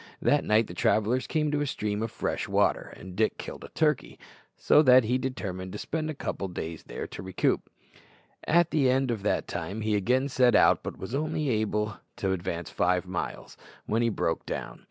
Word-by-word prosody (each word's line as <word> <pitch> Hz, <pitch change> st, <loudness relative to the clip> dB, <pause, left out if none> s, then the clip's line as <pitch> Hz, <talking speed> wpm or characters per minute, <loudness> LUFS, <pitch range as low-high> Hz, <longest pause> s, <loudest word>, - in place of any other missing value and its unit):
That -, -, +3 dB
night 110 Hz, +1 st, +3 dB
the 85 Hz, -, -9 dB
travellers 110 Hz, +7 st, +1 dB
came 155 Hz, -2 st, 0 dB
to 145 Hz, 0 st, 0 dB
a 145 Hz, -, 0 dB
stream 105 Hz, -4 st, -2 dB
of 115 Hz, -, -1 dB
fresh -, -, -3 dB
water, -, -, +1 dB
and 95 Hz, 0 st, -10 dB
Dick 110 Hz, +2 st, +1 dB
killed -, -, -7 dB
a -, -, -8 dB
turkey, 150 Hz, -3 st, 0 dB, 0.4 s
so -, -, +5 dB
that 130 Hz, -3 st, +7 dB
he 125 Hz, +4 st, +1 dB
determined 95 Hz, -8 st, -4 dB
to -, -, -4 dB
spend 155 Hz, +7 st, -3 dB
a 155 Hz, -, -4 dB
couple 100 Hz, -, -4 dB
of 90 Hz, -2 st, -7 dB
days 80 Hz, 0 st, -5 dB
there -, -, -6 dB
to -, -, -8 dB
recruit. 95 Hz, 0 st, 0 dB, 0.9 s
At 170 Hz, +1 st, +4 dB
the 140 Hz, -5 st, +3 dB
end 130 Hz, 0 st, +2 dB
of 110 Hz, -4 st, -3 dB
that 105 Hz, -, 0 dB
time 110 Hz, +3 st, -4 dB
he 110 Hz, -1 st, +1 dB
again 125 Hz, +7 st, +2 dB
set 125 Hz, -2 st, +3 dB
out, -, -, +5 dB
but -, -, -6 dB
was 95 Hz, +6 st, -7 dB
able 140 Hz, -, +1 dB, 0.6 s
only 105 Hz, -1 st, -3 dB, 0.2 s
to 95 Hz, -, -1 dB
advance 85 Hz, -4 st, -3 dB
five 90 Hz, +1 st, +1 dB
miles 90 Hz, -1 st, -5 dB, 0.3 s
when 110 Hz, +2 st, +1 dB
he 115 Hz, -, +3 dB
broke 85 Hz, -6 st, -1 dB
down. -, -, -5 dB
110 Hz, 205 wpm, -28 LUFS, 95-130 Hz, 0.9 s, that